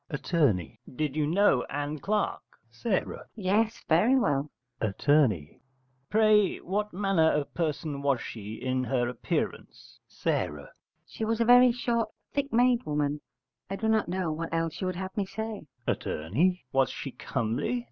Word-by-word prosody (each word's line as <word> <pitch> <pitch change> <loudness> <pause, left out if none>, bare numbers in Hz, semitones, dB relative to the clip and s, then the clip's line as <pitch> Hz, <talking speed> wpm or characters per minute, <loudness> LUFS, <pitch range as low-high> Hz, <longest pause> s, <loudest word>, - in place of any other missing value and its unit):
Att. 150 - -6 0.6
Did 150 0 -1
you 150 -1 +1
know 175 -6 +4
Ann 145 +1 -3
Clark? 210 +7 0 0.3
S. 190 - 0 0.3
Yes, 220 +3 0
very 205 +11 +4
well. 145 - +1 0.3
Att. 110 +4 -3 1.0
Pray, 215 -2 +4
what 210 +3 -2
manner 185 -4 +2
of 150 -1 -2
person 155 -3 -2
was 140 -3 +2
she 110 -1 -7
in 130 0 -1
her 125 -1 +1
appearance? 125 -1 -4
S. - - -1 0.6
She - - -6
was 225 +1 0
a 230 - +3
very 245 +1 +7
short 235 -1 -1 0.2
thick 280 0 -1
made 245 +1 +3
woman: 150 0 -1 0.5
I 195 - -2
do 220 +3 -2
not 220 -1 +2
know 180 -2 -1
what 165 +2 -4
else 165 -1 -2
you 185 - 0
would 185 - -2
have 190 0 -5
me 200 -2 -1
say. 215 -3 -5 0.2
Att. - - -1 0.7
Was 135 -1 +3
she - - -6
comely? 120 - -2
185 Hz, 150 wpm, -28 LUFS, 145-220 Hz, 1.0 s, very